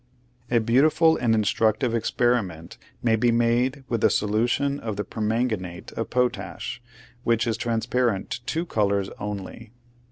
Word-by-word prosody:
A 120 - +3
beautiful 145 +8 +4
and 115 -2 +2
instructive 110 +3 +1
experiment 110 -7 -1 0.2
may 115 -2 +3
be 120 +2 +2
made 120 +4 +1
with 115 -3 -2
a - - +6
solution 120 +7 +1
of 110 -5 -4
the 105 - -2
permanganate 110 -6 -2
of 115 - -4
potash, 120 -4 -2 0.4
which 115 0 +2
is 115 -2 0
transparent 115 -2 -1
to 120 - -4
two 165 +6 -2
colors 100 - 0
only. 105 +2 -6
115 Hz, 135 wpm, -25 LUFS, 105-125 Hz, 0.4 s, a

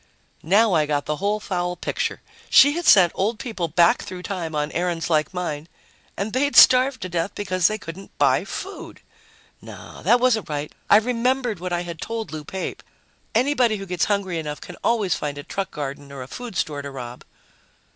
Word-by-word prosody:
Now 205 +5 +3
I 155 -3 +2
got 145 -1 -1
the 150 - -2
whole 205 +4 0
foul 180 -3 -2
picture. - - -3 0.3
She 285 - +7
had 345 +3 -3
sent 180 -4 +7
old 215 +4 -1
people 215 -9 -3
back 170 +2 +3
through 180 -1 -8
time 170 -6 -4
on 150 0 -1
errands 175 -1 -2
like 155 -2 +2
mine... 170 -4 -4 0.5
and 205 +2 -3
they'd 285 +3 +1
starved 255 -2 +6
to - - -3
death 170 +2 -2
because 185 -3 +1
they 215 - -2
couldn't 185 0 -10
buy - - +3
food! - - -8 0.6
No, - - -11
that 245 - +4
wasn't 240 -6 +1
right. 150 0 -4 0.2
I 205 - +8
remembered 245 -1 0
what 180 +1 -5
I 175 0 0
had 170 -2 -8
told 225 -1 -4
Lou 155 -1 -6
Pape: 190 +5 -5 0.5
anybody 250 -2 +3
who 195 - -7
gets 180 -2 0
hungry 195 -5 -1
enough 150 -2 -5
can 180 - -10
always 215 -6 +2
find 145 -1 -4
a 145 - -6
truck 195 +4 -4
garden 140 -1 -6
or 135 -2 -7
a - - -11
food 240 - -8
store 145 -2 -2
to 140 - -7
rob. 125 -3 -8
180 Hz, 195 wpm, -23 LUFS, 155-220 Hz, 0.6 s, I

